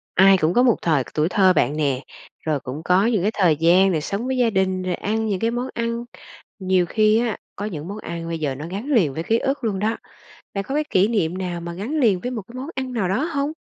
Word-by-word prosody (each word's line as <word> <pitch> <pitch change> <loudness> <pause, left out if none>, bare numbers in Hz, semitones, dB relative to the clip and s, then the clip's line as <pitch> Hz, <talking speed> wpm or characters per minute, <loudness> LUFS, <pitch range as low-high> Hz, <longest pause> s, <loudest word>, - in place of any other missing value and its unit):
Ai 195 0 +7
cũng 165 +1 +1
có 245 - +4
một 240 -3 +4
thời 155 -6 +2
tuổi 155 +2 +1
thơ 190 -1 +4
bạn 150 - +1
nè, 140 -4 0 0.4
rồi 155 -3 0
cũng 135 +4 -7
có 180 +4 +3
những 225 -5 +2
cái 205 +4 +1
thời 175 -6 +3
gian 175 +5 +4
được 165 - +1
sống 200 +10 -3
với 260 0 -1
gia 245 -2 +3
đình 190 -2 0
rồi 185 -1 -1
ăn 220 +2 -2
những 200 -4 -1
cái 230 +1 0
món 245 +2 -2
ăn. 235 +1 -2 0.5
Nhiều 185 -1 +2
khi 215 +4 +3
á 235 -3 -1 0.2
có 205 - -4
những 160 -6 -5
món 200 +2 -6
ăn 170 -5 -6
bây 165 -1 -3
giờ 145 -4 -2
nó 150 +4 -7
gắn 195 +7 -5
liền 220 - +2
với 160 - -4
ký 225 +6 +2
ức 270 +3 -2
luôn 205 -4 -1
đó! 220 +3 0 0.6
Bạn 200 -1 -2
có 270 - -5
cái 305 +1 +1
kỷ 190 +2 +3
niệm 185 -6 0
nào 180 -2 -3
mà 170 0 -6
gắn 200 +8 -5
liền 210 -8 +3
với 250 - -4
một 235 -4 -4
cái 235 - -14
món 260 +3 -6
ăn 260 -1 -4
nào 215 -7 -1
đó 210 +10 0
hông? 295 -3 -2
195 Hz, 270 wpm, -22 LUFS, 170-230 Hz, 0.6 s, Ai